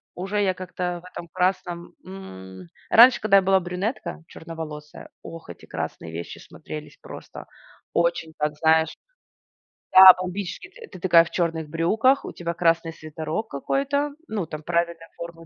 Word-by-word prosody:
уже 195 +3 -2
я 190 - +1
как-то 180 -1 -5
в - - -12
этом 170 - -9
красном, 180 -2 -2
м. 95 - -10 0.2
Раньше, 240 +3 +7
когда 200 -2 +5
я 195 - +4
была 190 0 +4
брюнетка 180 +1 -4
черноволосая, 155 -2 -9
ох, 165 - -10
эти 85 - -11
красные 80 - -6
вещи 85 +1 -7
смотрелись 75 0 -10
просто - - -10 0.5
очень 170 -1 0
так, 150 0 -1
знаешь 160 0 +2 1.0
Да, 190 0 +12
бомбически. 185 - -5
Т 460 +3 -13
ты - - -9
такая 170 -2 +6
в - - -9
черных 165 -3 -1
брюках, 220 - +2
у - - -7
тебя 170 -1 -4
красный 165 -1 +1
свитерок 155 +6 -5
какой-то. 280 - -1 0.2
Ну, 205 -6 -3
там, 155 0 -8
правильная 170 0 -2
форма, 170 -1 -9
170 Hz, 150 wpm, -24 LUFS, 160-190 Hz, 1.0 s, Да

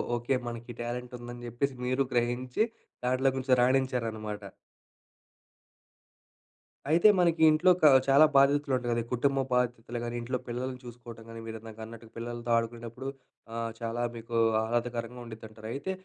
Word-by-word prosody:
Okay 120 +3 0
మనకి 120 0 -6
talent 125 +1 -4
ఉందని 120 0 -8
చెప్పేసి 125 +4 -1
మీరు 130 +2 +2
గ్రహించి, 125 - +1 0.4
దాంట్లో 130 +2 +3
కొంచెం 130 -1 +3
రాణించారనమాట. 115 -5 0 2.5
అయితే, 170 +6 +6
మనకి 170 -2 +3
ఇంట్లోక 180 +4 +4 0.3
చాలా 140 +3 +7
బాధ్యతలుంటాయి 140 -2 +3
గదా! 115 0 +1
కుటుంబ 135 +3 +1
బాధ్యతలు 120 -1 0
గాని, 120 0 -4
ఇంట్లో 125 +2 -2
పిల్లల్ని 125 +2 -4
చూసుకోవటం 120 -1 -10
గాని, 115 0 -8
మీరు 110 0 -5
ఇందాక 110 0 -11
అన్నట్టుగా, 115 0 -12
పిల్లలతో 120 0 -4
ఆడుకునేటప్పుడు 120 +3 -4 0.5
ఆహ్, 115 0 -2
చాలా 115 0 -3
మీకు 115 +1 -6 0.3
ఆహ్లాదకరంగా 120 +1 -2
ఉండిద్దంటారు. 110 -1 -10
అయితే, 145 +8 -3
120 Hz, 125 wpm, -29 LUFS, 115-130 Hz, 2.5 s, చాలా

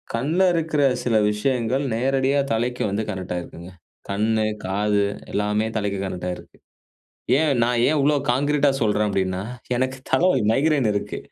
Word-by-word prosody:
கண்ல 150 +10 0
இருக்கிற 160 -3 0 0.2
சில 120 -3 0 0.2
விஷயங்கள் 125 +4 0
நேரடியா 135 +3 +1
தலைக்கு 120 +2 -1
வந்து 100 +3 -1
கனெக்டாகிருக்குங்க 90 -2 -6 0.4
கண்ணு 110 +2 +1 0.2
காது 100 +1 +1 0.3
எல்லாமே 105 +1 0
தலைக்கு 100 -2 -2
கனெக்டா 90 -1 -4
ஆயிருக்குங்க. 90 - -11 0.8
ஏன் 155 -1 +2
நான் 120 0 +1
ஏன் 155 - +2
இவ்வளோ 145 +2 +3 0.2
கான்கிரீட்டா 145 +2 +2
சொல்றேன் 105 -1 +1
அப்டின்னா 95 -1 -1 0.3
எனக்கு 130 +1 -1
தலவலி, 185 -6 +3
மைக்ரேன் 140 -3 +2
இருக்கு. 100 - -3
115 Hz, 135 wpm, -22 LUFS, 100-140 Hz, 0.8 s, இவ்வளோ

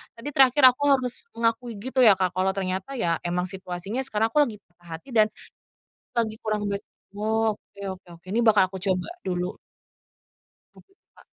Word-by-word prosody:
tadi 230 +5 -6
terakhir 270 0 +4
aku 255 +3 -7
harus 260 - +1
mengakui 230 +1 0
gitu 260 +6 -3
ya, 220 -6 +7
Kak, 185 -1 0
kalau 190 +1 +2
ternyata 190 +6 -3
ya 170 -9 0
memang 180 +1 0
situasinya 190 +4 -5
sekarang 220 -2 0
aku 300 - +2
lagi 225 - -6 0.2
patah 175 0 -23
hati 220 - -19
dan 215 -3 +5 0.9
lagi 225 -2 -1
kurang 210 -1 -1
baik. 200 0 -3 0.3
Oke 215 -1 -2
oke 185 -1 -13
oke, 180 - -36
ini 230 - +2
bakal 215 -4 +5
aku 190 - -5
coba 185 -1 -1 0.2
dulu. 180 0 -2 1.2
Tuh, - - -17 0.3
Kak. - - -20
210 Hz, 170 wpm, -25 LUFS, 185-235 Hz, 1.2 s, ya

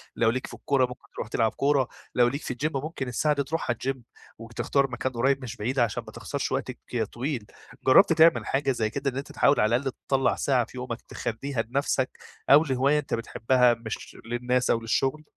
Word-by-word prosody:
لو 115 - +3
ليك 130 +3 -2
في - - -12
الكورة 135 -2 +1
ممكن 125 0 -11
ترُوح - - -4
تلعب 110 -1 +1
كورة، 140 -2 +2 0.3
لو 120 -1 +5
ليك 140 +5 -2
في - - -4
الجيم 145 +5 -2
ممكن 135 -1 -3
الساعة 150 +5 +1
دي 140 - 0
ترُوحها 160 -4 -1
الجيم 130 +1 -4 0.3
وتختار 120 +4 -1
مكان 125 +2 -2
قريّب 135 +3 +1
مش 115 - -6
بعيد 125 +6 -2
علشان 115 -4 +1
ما - - -8
تخسرش - - -4
وقتك - - -3
ك 120 -2 -1
طويل، 120 +2 -4 0.4
جربت 165 +7 +7
تعمل 165 +1 +5
حاجة 135 0 0
زي 110 -4 0
كده 140 +5 -2
إن 130 - -7
أنت 140 - -5
تحاول 140 - +3
على 110 +2 +3
الأقل 135 +2 -1 0.2
تطلّع 135 -1 +2
ساعة 130 -4 +1
في 130 - -13
يومك 125 -2 -5
تخليها 120 +2 -3
لنفسك، 130 +2 0 0.4
أو 145 +3 +8
لهواية 140 +1 +2
أنت 140 - -5
بتحبها 120 +2 +2
مش 115 -1 -7
للناس 125 +2 0
أو 115 - +3
للشغل؟ 135 +6 0
130 Hz, 205 wpm, -26 LUFS, 120-140 Hz, 0.4 s, أو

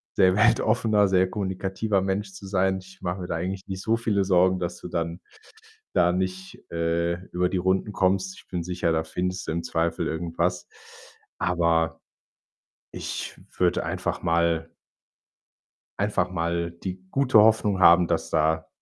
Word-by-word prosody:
sehr 95 -1 +4
weltoffener, 110 -2 +3
sehr 95 -1 +3
kommunikativer 95 +1 -1
Mensch 95 +1 -2
zu 95 +1 -10
sein. 95 0 +1
Ich 95 0 -16
mache 90 +1 -3
mir 90 - -5
da - - -2
eigentlich 95 +3 -4
nicht 95 -1 -5
so 115 +3 +1
viele 105 -4 +1
Sorgen, 95 0 +3
dass 90 0 -3
du - - -6
dann 85 +1 -3 0.7
da 85 +1 +4
nicht, 95 0 -4
äh, 85 +1 0 0.2
über 90 0 +1
die 95 - -1
Runden 95 +3 0
kommst. 95 0 0
Ich - - -19
bin 90 -2 -3
sicher, 90 -1 -1
da 80 0 +1
findest 90 +3 -3
du - - -1
im 85 +1 -2
Zweifel 80 0 -1
irgendwas. 85 +2 -2 0.7
Aber 80 -2 +1 0.9
ich - - -5 0.2
würde - - +2
einfach - - -3
mal 85 -1 +1 1.3
einfach 100 -3 0
mal 85 -1 -1
die 90 +2 -7
gute 135 -5 +4
Hoffnung 105 -3 +4
haben, 85 0 +7
dass 85 -1 -1
da 80 0 +1
90 Hz, 155 wpm, -25 LUFS, 85-95 Hz, 1.3 s, haben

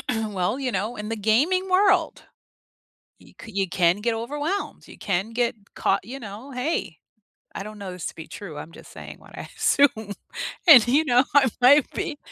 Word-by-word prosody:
Well, 220 +1 -2
you 255 -2 -1
know, 210 +4 -2
in 210 0 -6
the 225 - -3
gaming 290 - +1
world, 370 -3 +2 1.0
you - - -20
c 225 - -11
you 195 -1 -1
can 175 +1 +2
get 230 +1 0
overwhelmed, 295 - -4
you - - -13
can 195 +3 -2
get 235 -1 0 0.2
caught - - 0
you 260 +5 -8
know, 220 +6 -9
hey, 250 - -3 0.6
I - - -5
don't 215 0 -10
know 190 -2 -7
this 180 - -7
to - - -5
be 160 - -10
true, 165 -8 -9
I'm 165 - -9
just - - -14
saying - - -10
what - - -15
I - - -8
assume, 220 -7 +2 0.6
and, 245 -7 +9
you 285 +6 +3
know, 250 +1 +4
I 275 -2 +6
might 280 +2 +6
be. 295 -2 -4
230 Hz, 190 wpm, -24 LUFS, 200-280 Hz, 1.0 s, and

